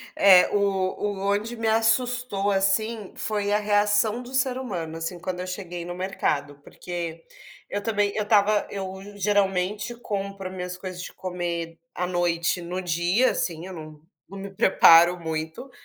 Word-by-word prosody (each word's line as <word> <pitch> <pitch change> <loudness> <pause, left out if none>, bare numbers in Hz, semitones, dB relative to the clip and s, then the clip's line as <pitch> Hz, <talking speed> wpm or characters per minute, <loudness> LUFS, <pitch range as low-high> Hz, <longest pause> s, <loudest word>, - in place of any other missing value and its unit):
É, 190 -2 +7
o 195 -2 +2
o 205 -1 -2
onde 205 +4 -1
me 225 -1 -2
assustou, 225 -2 +1
assim, 200 +2 0
foi 205 -1 -2
a 210 - +3
reação 210 +2 +2
do 250 +1 -11
ser 260 -1 +1
humano, 175 -11 -4
assim, 165 +2 -5
quando 180 +1 -4
eu 180 - -4
cheguei 180 -2 -6
no 175 - -5
mercado, 150 -6 -2
porque 170 -1 -6 0.5
eu 205 - -2
também, 205 -2 +1
eu 210 - 0
estava, 210 0 +3
eu 190 -1 -5 0.2
geralmente 200 +1 0
compro 195 -4 -5
minhas 180 -1 -5
coisas 185 -1 -7
de - - -8
comer 170 -2 -4 0.2
à 180 - -2
noite 175 0 0
no 180 +2 -4
dia 180 +8 +2
,assim, 165 -1 -3
eu 190 - -8
não 155 -2 -10 0.3
não 195 - -9
me 195 0 -7
preparo 175 -2 +6
muito, 160 +8 -5
195 Hz, 160 wpm, -25 LUFS, 175-210 Hz, 0.5 s, É